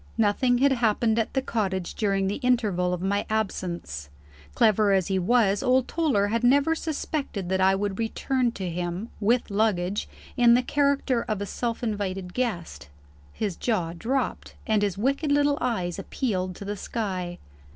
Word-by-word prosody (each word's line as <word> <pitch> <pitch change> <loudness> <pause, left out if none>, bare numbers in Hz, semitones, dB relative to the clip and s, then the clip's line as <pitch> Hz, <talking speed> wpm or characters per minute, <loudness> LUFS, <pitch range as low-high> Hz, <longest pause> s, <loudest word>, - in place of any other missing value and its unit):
Nothing 230 +3 +3
had 275 +2 +4
happened 230 -2 +2
at 225 - -2
the 265 - +1
cottage, 190 -7 -2
during 195 -2 0
the 195 +2 -1
interval 215 -9 +1
of 180 0 -3
my 200 +1 +1
absence. 175 - -3 0.5
Clever 215 -1 +4
as 190 -1 +1
he 190 -1 +1
was, 205 0 +3
old 255 0 +2
Toller 270 -12 +1
had 230 +2 0
never 280 +6 +4
suspected 290 - -3
that 190 0 +1
I 190 +1 +5
should 195 0 -2
return 245 +2 0
to 190 -4 -4
him 175 +5 -3
(with 230 +2 +1
luggage!) 200 -2 0 0.3
in 240 -1 +6
the 250 - +2
character 280 -3 +1
of 215 -2 -1
a 205 - -3
self 235 +3 -3
invited 195 -4 -3
guest. 205 - -3 0.4
His 200 - -3
jaw 180 -8 -1
dropped, 245 +9 -2
and 215 -2 +2
his 200 -3 0
wicked 275 +7 0
little 285 0 +3
eyes 185 -8 -1
appealed 185 -8 -2
to 200 - -8
the 205 +1 -3
sky. 185 -6 -3
210 Hz, 165 wpm, -26 LUFS, 190-245 Hz, 0.5 s, in